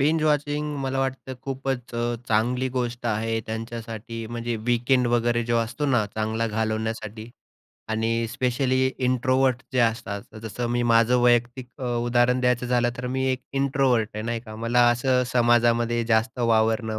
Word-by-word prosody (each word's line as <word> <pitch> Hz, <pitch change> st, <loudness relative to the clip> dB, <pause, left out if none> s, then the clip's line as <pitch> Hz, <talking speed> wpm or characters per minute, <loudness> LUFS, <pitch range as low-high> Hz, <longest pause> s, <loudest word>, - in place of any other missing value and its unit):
Binge 155 Hz, +3 st, +2 dB
watching 150 Hz, 0 st, 0 dB
मला 135 Hz, 0 st, -2 dB
वाटतं 130 Hz, 0 st, -3 dB
खूपच 135 Hz, -3 st, -4 dB
अ, 120 Hz, 0 st, -1 dB
चांगली 125 Hz, +4 st, +1 dB
गोष्ट 120 Hz, -1 st, -2 dB
आहे 115 Hz, 0 st, 0 dB
त्यांच्यासाठी, 115 Hz, 0 st, -6 dB
म्हणजे 120 Hz, 0 st, -3 dB
वीकेंड 125 Hz, +1 st, +2 dB
वगैरे 120 Hz, 0 st, +1 dB
जो 120 Hz, 0 st, +1 dB
असतो 115 Hz, +5 st, -2 dB
ना, 125 Hz, -6 st, +2 dB
चांगला 110 Hz, +1 st, -1 dB
घालवण्यासाठी. 110 Hz, 0 st, -3 dB, 0.6 s
आणि 115 Hz, +1 st, 0 dB
स्पेशली 130 Hz, +1 st, +1 dB
इंट्रोव्हर्ट 130 Hz, 0 st, +1 dB
जे 130 Hz, -, 0 dB
असतात. 115 Hz, -3 st, 0 dB, 0.2 s
जसं 115 Hz, +2 st, -4 dB
मी 120 Hz, 0 st, +1 dB
माझं 115 Hz, +2 st, +4 dB
वैयक्तिक 120 Hz, +1 st, +2 dB
अ, 130 Hz, -, -5 dB, 0.2 s
उदाहरण 120 Hz, +1 st, +2 dB
द्यायचं 125 Hz, 0 st, +1 dB
झालं, 120 Hz, -1 st, +2 dB
तर 125 Hz, -, -5 dB
मी 130 Hz, +1 st, -1 dB
एक 130 Hz, -, -3 dB
इंट्रोव्हर्ट 135 Hz, -5 st, +1 dB
आहे, 110 Hz, -, -4 dB
नाही 115 Hz, 0 st, -2 dB
का. 110 Hz, -2 st, -11 dB
मला 120 Hz, +2 st, +3 dB
असं 125 Hz, +1 st, +2 dB
समाजामध्ये 120 Hz, -1 st, +3 dB
जास्त 115 Hz, +2 st, +1 dB
वावरणं 110 Hz, -1 st, +1 dB
120 Hz, 150 wpm, -24 LUFS, 115-130 Hz, 0.6 s, माझं